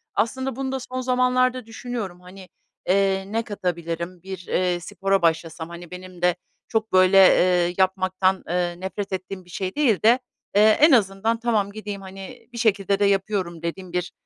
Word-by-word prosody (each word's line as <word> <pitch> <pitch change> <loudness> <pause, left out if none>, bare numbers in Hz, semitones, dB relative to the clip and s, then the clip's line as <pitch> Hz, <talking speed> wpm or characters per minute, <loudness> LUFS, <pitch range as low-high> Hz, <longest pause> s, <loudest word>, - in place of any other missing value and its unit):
Aslında 260 +4 -1
bunu 265 0 -3
da 265 - -2
son 255 +1 -5
zamanlarda 255 -1 +1
düşünüyorum, 225 -6 -6
hani, 185 +1 -13 0.4
eee, 195 0 +2
ne 225 +3 -1
katabilirim? 170 -3 -4
Bir, 190 -2 -8
eee, 180 -1 0
spora 195 +2 -1
başlasam, 165 0 -1
hani, 170 0 -10
benim 180 -1 -10
de 180 -1 +3 0.3
çok 220 -1 -1
böyle, 185 +1 +5
eee, 180 -2 +5
yapmaktan, 185 0 +1
eee, 175 0 -1
nefret 190 +1 -5
ettiğim 185 0 -5
bir - - -20
şey 185 +2 -4
değil 255 -10 +2
de, 235 +3 +6 0.4
eee, 205 - +6 0.2
en 310 +2 +7
azından, 220 -1 +2
"Tamam, 215 -4 0
gideyim, 205 -2 -6
hani, 195 +6 -10
bir - - -8
şekilde 200 -3 +1
de 205 - +3
yapıyorum." 195 -4 0
dediğim 175 +1 -5
bir, 180 0 -2
195 Hz, 170 wpm, -23 LUFS, 180-220 Hz, 0.4 s, en